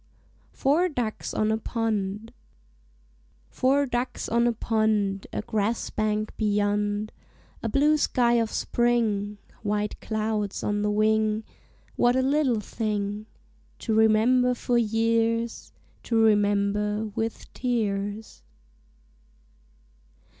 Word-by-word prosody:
FOUR 320 +7 +2
DUCKS 240 -8 -3
ON 215 0 +1
A 220 - 0
POND 220 -1 -2 1.2
Four 275 +2 +2
ducks 245 -1 -3
on 235 +1 +2
a - - +3
pond, 215 -3 0
A - - -3
grass 220 +1 -1
bank 215 0 -1
beyond, 205 0 0 0.5
A 225 - -2
blue 295 +6 +3
sky 240 -4 +2
of 225 - -1
spring, 220 -4 0 0.2
White 210 0 -2
clouds 215 -2 -2
on 205 0 0
the 210 - +1
wing; 215 +1 +2 0.5
What 245 +1 +3
a 260 - +2
little 265 -5 +2
thing 210 -1 -3 0.5
To 225 - -2
remember 225 +3 +4
for 245 0 -1
years 230 0 0 0.3
To 230 - 0
remember 210 0 +2
with 225 0 -4
tears! 215 -3 -2
220 Hz, 105 wpm, -26 LUFS, 210-235 Hz, 1.2 s, remember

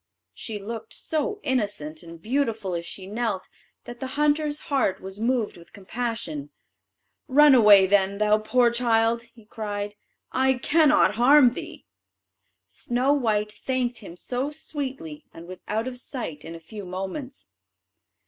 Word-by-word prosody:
She 220 -2 -6
looked 220 +2 -7
so 320 +7 -2
innocent 205 - -2
and 170 -1 -11
beautiful 225 - -1
as 170 0 -4
she 190 - -8
knelt, 210 -2 -3 0.4
that 240 0 -10
the 265 - -4
hunter's 300 0 +1
heart 260 -9 0
was 190 +1 -7
moved 230 -3 0
with 170 0 -17
compassion: 200 - -4 0.8
"Run 295 +1 +6
away, 210 -5 +8
then, 195 0 +2
thou 215 0 +3
poor 235 +3 +3
child," 230 -1 +2
he 225 -3 -17
cried; 205 -1 -5 0.4
"I 265 0 +2
cannot 300 -4 +3
harm 260 -1 +7
thee." - - -8 0.8
Snow 250 +4 0
white 215 -6 0
thanked 250 +1 -2
him 180 -5 -11
so 250 +8 -2
sweetly, 270 - -6
and 165 +1 -11
was 185 0 -10
out 220 +2 -1
of 250 -1 -5
sight 225 - -6
in 165 - -8
a - - -9
few 205 +6 -9
moments. 195 - -6
225 Hz, 145 wpm, -25 LUFS, 195-260 Hz, 0.8 s, away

